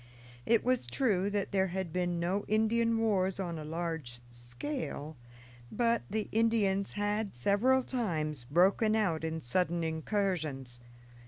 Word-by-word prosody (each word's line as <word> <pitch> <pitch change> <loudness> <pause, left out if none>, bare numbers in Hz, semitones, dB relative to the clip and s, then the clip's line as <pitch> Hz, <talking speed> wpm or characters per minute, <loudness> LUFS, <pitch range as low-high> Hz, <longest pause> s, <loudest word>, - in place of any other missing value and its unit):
It 230 -1 +4
was 255 -1 +1
true 200 -8 +1
that 205 -1 -2
there 190 -1 +2
had 185 -2 -4
been 175 -1 0
no 185 +4 0
Indian 225 +2 +2
wars 195 -4 +1
on 170 -4 -3
a - - -6
large 160 -6 -4
scale, 145 - -5 0.6
but 235 +1 +1
the 215 +1 -2
Indians 210 -4 +2
had 205 - -1
several 215 - +3
times 155 - -2
broken 195 +7 +4
out 175 -8 +1
in 160 0 -3
sudden 170 +5 0
incursions. 160 - -2
190 Hz, 135 wpm, -31 LUFS, 160-220 Hz, 0.6 s, It